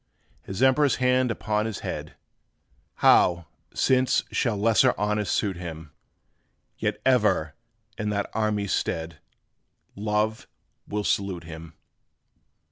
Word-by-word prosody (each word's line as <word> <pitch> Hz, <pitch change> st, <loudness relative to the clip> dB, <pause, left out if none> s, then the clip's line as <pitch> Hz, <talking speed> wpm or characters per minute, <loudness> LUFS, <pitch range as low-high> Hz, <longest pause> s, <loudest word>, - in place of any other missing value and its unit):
His 95 Hz, +6 st, -3 dB
Emperor's 135 Hz, +2 st, +4 dB
hand 125 Hz, 0 st, +2 dB
upon 110 Hz, -1 st, -1 dB
his 110 Hz, -, -5 dB
head! -, -, -6 dB, 0.9 s
How, 85 Hz, -2 st, +5 dB, 0.3 s
since, 130 Hz, -1 st, +2 dB
shall 115 Hz, -4 st, 0 dB
lesser 110 Hz, +1 st, +3 dB
honors 105 Hz, -1 st, -1 dB
suit 100 Hz, -4 st, 0 dB
him? 80 Hz, -3 st, -8 dB, 0.9 s
Yet -, -, -1 dB
ever, 80 Hz, -1 st, +2 dB, 0.5 s
in 105 Hz, -1 st, -1 dB
that 100 Hz, -1 st, -1 dB
army's 105 Hz, -2 st, 0 dB
stead, 80 Hz, -1 st, -2 dB, 0.8 s
Love 105 Hz, +1 st, -1 dB, 0.4 s
will 105 Hz, 0 st, -2 dB
salute 95 Hz, -4 st, -1 dB
him. 80 Hz, -1 st, -10 dB
105 Hz, 110 wpm, -25 LUFS, 85-110 Hz, 0.9 s, How